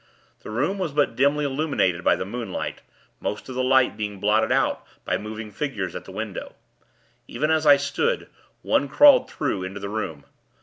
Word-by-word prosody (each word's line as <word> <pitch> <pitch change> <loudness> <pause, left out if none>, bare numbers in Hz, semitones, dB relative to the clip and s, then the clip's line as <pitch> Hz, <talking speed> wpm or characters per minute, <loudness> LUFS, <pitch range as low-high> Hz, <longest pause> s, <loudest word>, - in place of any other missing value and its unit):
The - - -10
room 145 - -1
was 170 -6 -2
but 145 -5 +1
dimly 145 +3 +2
illuminated 135 - 0
by - - +4
the - - -4
moonlight; 120 +4 -5 0.4
most 105 - -4
of - - -5
the 130 0 -1
light 130 0 +3
being 105 -2 -4
blotted 105 +2 +2
out - - +1 0.2
by - - 0
moving 110 0 -6
figures 110 -8 -4
at - - -6
the - - -10
window. 105 0 -6 0.7
Even 150 +1 -1
as 160 -1 +2
I 145 -1 +8
stood, 140 +1 -1 0.4
one 140 - +2
crawled 280 - +6
through, 130 -10 -2
into 95 +2 -5
the 100 0 -5
room. 85 -10 -4
125 Hz, 180 wpm, -24 LUFS, 105-145 Hz, 0.7 s, I